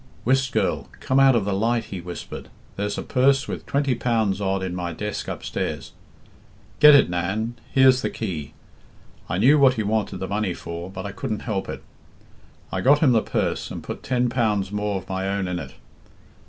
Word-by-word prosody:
"'Whist, 130 +1 +2
girl, 80 -11 -1
come 130 - +1
out 135 -2 +6
of 110 -4 +1
the 100 - -1
light,' 115 +4 +1
he 90 - -5
whispered. 90 0 -8 0.3
'There's 105 +1 -2
a - - -3
purse 135 +1 +2
with - - -6
twenty 140 -2 +1
pounds 110 -5 0
odd 95 -1 0
in 95 -1 -3
my 90 -2 -3
desk 105 +5 -4
upstairs; - - -4 0.9
get 150 -1 +9
it, 140 - +6
Nan, 95 +7 -2 0.2
here's 130 -1 +5
the - - -1
key.' 80 -9 -5 0.8
I 90 - -1
knew 135 +9 +5
what 135 -2 +5
he 110 - -1
wanted 105 0 -1
the 95 - -4
money 100 -2 -1
for, 85 +2 -7
but 95 0 -7
I 100 - -4
couldn't 105 +2 -4
help 100 -4 -3
it; - - -6 0.9
I 95 - -2
got 140 +8 +5
him 145 -3 +4
the 115 -2 +4
purse - - -2
and - - -7
put - - -6
ten 125 -1 0
pounds 105 -6 0
more 105 -1 -1
of 95 - -8
my 95 0 -2
own 100 -1 -1
in 90 -1 -2
it. 70 -4 -9
105 Hz, 195 wpm, -23 LUFS, 95-125 Hz, 0.9 s, get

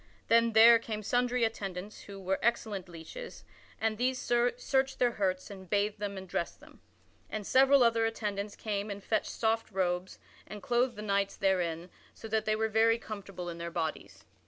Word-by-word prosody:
Then 230 0 +4
there 230 +1 +8
came 215 -2 -5
sundry 245 +2 +1
attendants 200 -3 -3
who 200 -1 -9
were 190 0 -1
excellent 215 -5 -1
leeches 175 - -9 0.4
and 220 0 -1
these 255 +1 +1
searched 245 +3 +1
their 245 -1 +3
hurts 190 -3 -2
and 190 -2 -11
bathed 205 +1 0
them 200 -1 -4
and 190 0 -8
dressed 170 -1 -3
them. - - -18 0.5
And 215 -2 -4
several 270 +2 +5
other 230 -1 +3
attendants 210 -2 -3
came 205 -1 -3
and 200 -1 -6
fetched 215 +1 0
soft 225 0 -1
robes 185 -1 -1 0.3
and 210 -1 -9
clothed 245 +1 +1
the 210 - -7
knights 200 -1 0
therein 180 -3 0 0.2
so - - -9
that 220 0 0
they 215 - +2
were 220 +1 0
very 225 +1 +3
comfortable 200 -5 -7
in 170 -1 -6
their 170 0 -4
bodies. 165 -2 -4
210 Hz, 180 wpm, -31 LUFS, 190-230 Hz, 0.5 s, there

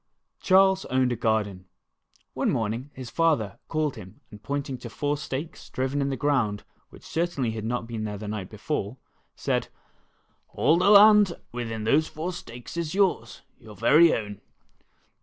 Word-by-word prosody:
CHARLES 190 0 +4
owned 130 -1 +1
a - - 0
garden. 105 -5 -1 0.7
One - - 0
morning 115 +5 -2
his 130 -3 -8
father 150 - +1
called 155 -5 -1
him 95 -4 -12
and 105 - -12
pointing 140 -1 -4
to - - -8
four 145 0 -1
stakes 145 +2 -6
driven 135 +2 -2
in 140 - 0
the 135 - -2
ground 125 -9 0 0.3
which - - -16
certainly 160 -8 -1
had 110 -1 -5
not 120 +1 -2
been 115 -2 -5
there 105 -1 -4
the 105 +1 -7
night 105 -3 -5
before, 110 0 -4 0.4
said: - - -1 0.9
''AH 160 +4 +4
the 185 - +3
land 210 -2 +7 0.2
within 115 -2 -4
those 145 +8 +3
four 170 +4 -5
stakes 120 -3 -9
is 170 0 -3
yours, 180 - 0 0.2
your 110 -2 -13
ver\ 120 +8 +4
o^^Tl. 110 - +3
130 Hz, 160 wpm, -26 LUFS, 110-155 Hz, 0.9 s, land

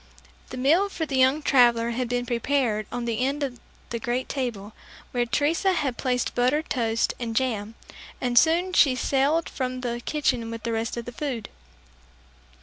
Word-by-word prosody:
The 255 - -7
meal 325 +10 +3
for 325 -4 -3
the 280 - -3
young 265 +4 +4
traveler 235 -3 +4
had 245 0 -2
been 245 0 -1
prepared 240 -3 0
on 245 -1 -3
the 230 -1 -2
end 275 +3 0
of 250 -3 -4 0.3
the 235 - -2
great 250 +1 -2
table, 225 -6 -4 0.4
where 240 -1 0
Teresa 320 +9 +1
had 280 -8 -1
placed 250 -2 0
buttered 255 +6 +1
toast 230 -2 +1
and 230 -2 -4
jam, 225 -4 -1 0.4
and 245 -1 -1
soon 335 +8 +4
she 280 -6 +5
sallied 280 +5 +1
from 255 -1 -4
the 240 -1 -3
kitchen 250 -6 0
with 230 -1 -7
the 235 - -2
rest 225 +1 -2
of 235 - -4
the 245 - -6
food. 245 -4 -4
250 Hz, 175 wpm, -25 LUFS, 235-280 Hz, 0.4 s, she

